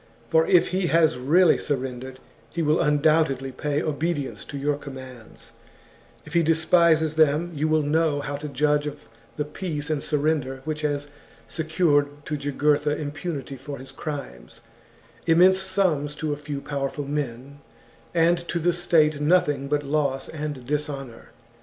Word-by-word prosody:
For 485 Hz, -1 st, +3 dB
if 375 Hz, -3 st, +4 dB
he 185 Hz, -1 st, 0 dB
has 160 Hz, -6 st, +3 dB
really 165 Hz, +8 st, +4 dB
surrendered, 130 Hz, -2 st, -4 dB, 0.3 s
he 170 Hz, -, -2 dB
will 155 Hz, +1 st, +2 dB
undoubtedly 150 Hz, -3 st, +2 dB
pay 145 Hz, +3 st, -2 dB
obedience 155 Hz, -2 st, -2 dB
to 145 Hz, -, -7 dB
your 145 Hz, +1 st, 0 dB
commands; 130 Hz, -5 st, -11 dB, 0.7 s
if -, -, -11 dB
he 170 Hz, -, +4 dB
despises 160 Hz, -1 st, +3 dB
them, 155 Hz, +2 st, +2 dB
you 155 Hz, +1 st, 0 dB
will 155 Hz, -1 st, +2 dB
know 150 Hz, 0 st, +1 dB
how 145 Hz, 0 st, -4 dB
to 150 Hz, +1 st, -6 dB
judge 150 Hz, +1 st, +1 dB
of 145 Hz, 0 st, -7 dB, 0.3 s
the 150 Hz, -, -2 dB
peace 150 Hz, -1 st, -4 dB
and 150 Hz, -2 st, 0 dB
surrender 145 Hz, -3 st, -1 dB
which 155 Hz, 0 st, -3 dB
has 145 Hz, -1 st, -2 dB, 0.4 s
secured 145 Hz, -3 st, 0 dB
to 150 Hz, -, -2 dB
Jugurtha 145 Hz, +1 st, +1 dB
impunity 145 Hz, -2 st, -5 dB
for 140 Hz, +2 st, -7 dB
his 135 Hz, +1 st, -9 dB
crimes, 135 Hz, -, -7 dB, 0.7 s
immense 185 Hz, +3 st, +5 dB
sums 180 Hz, -7 st, 0 dB
to 155 Hz, -1 st, -2 dB
a -, -, -2 dB
few 145 Hz, -1 st, -6 dB
powerful 140 Hz, 0 st, -3 dB
men, 140 Hz, -1 st, -4 dB, 0.5 s
and 170 Hz, 0 st, +3 dB
to -, -, -2 dB
the 175 Hz, +1 st, +2 dB
state 155 Hz, -4 st, +2 dB
nothing 150 Hz, -4 st, +2 dB
but 145 Hz, +1 st, 0 dB
loss 140 Hz, -2 st, -1 dB
and 150 Hz, -5 st, -5 dB
dishonour. 140 Hz, -4 st, -4 dB
150 Hz, 150 wpm, -24 LUFS, 140-160 Hz, 0.7 s, immense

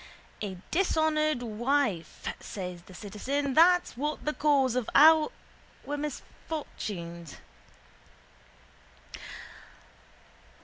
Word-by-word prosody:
—A 195 Hz, -3 st, -4 dB
dishonoured 310 Hz, -6 st, +2 dB
wife, 235 Hz, -, -1 dB
says 180 Hz, -3 st, -6 dB
the 185 Hz, -, -15 dB
citizen, 265 Hz, +9 st, -2 dB
that's 355 Hz, +2 st, +5 dB
what's 295 Hz, +5 st, -3 dB
the 300 Hz, -, -1 dB
cause 275 Hz, -5 st, +2 dB
of 250 Hz, -3 st, -1 dB
all 310 Hz, +1 st, +7 dB, 0.6 s
our 290 Hz, -, -2 dB
misfortunes. 200 Hz, -, -6 dB
275 Hz, 80 wpm, -29 LUFS, 205-305 Hz, 0.6 s, all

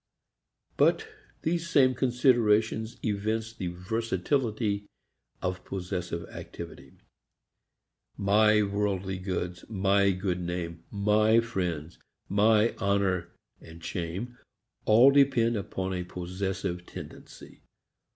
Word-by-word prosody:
But -, -, +3 dB, 0.4 s
these 170 Hz, +1 st, -1 dB
same 130 Hz, -4 st, +5 dB
considerations 120 Hz, -3 st, +2 dB
evince 110 Hz, +1 st, -1 dB
the 95 Hz, -5 st, -4 dB
versatility 105 Hz, +3 st, -1 dB, 0.6 s
of 90 Hz, 0 st, -2 dB
possessive 90 Hz, -2 st, -4 dB
activity. 65 Hz, 0 st, -9 dB, 1.2 s
My 105 Hz, +2 st, +4 dB
worldly 100 Hz, -2 st, -1 dB
goods, 90 Hz, -2 st, -4 dB
my 100 Hz, -1 st, +3 dB
good 95 Hz, -1 st, -1 dB
name, 85 Hz, -1 st, -4 dB
my 105 Hz, +2 st, +3 dB
friends, 90 Hz, -8 st, -3 dB, 0.3 s
my 105 Hz, +3 st, +4 dB
honor 95 Hz, -3 st, +1 dB, 0.3 s
and 80 Hz, +1 st, -13 dB
shame 95 Hz, +11 st, -4 dB, 0.5 s
all 120 Hz, +6 st, +7 dB
depend 135 Hz, -5 st, +4 dB
upon 95 Hz, -2 st, -3 dB
a 90 Hz, -1 st, -2 dB
possessive 90 Hz, 0 st, -4 dB
tendency. -, -, -11 dB
100 Hz, 95 wpm, -28 LUFS, 90-110 Hz, 1.2 s, all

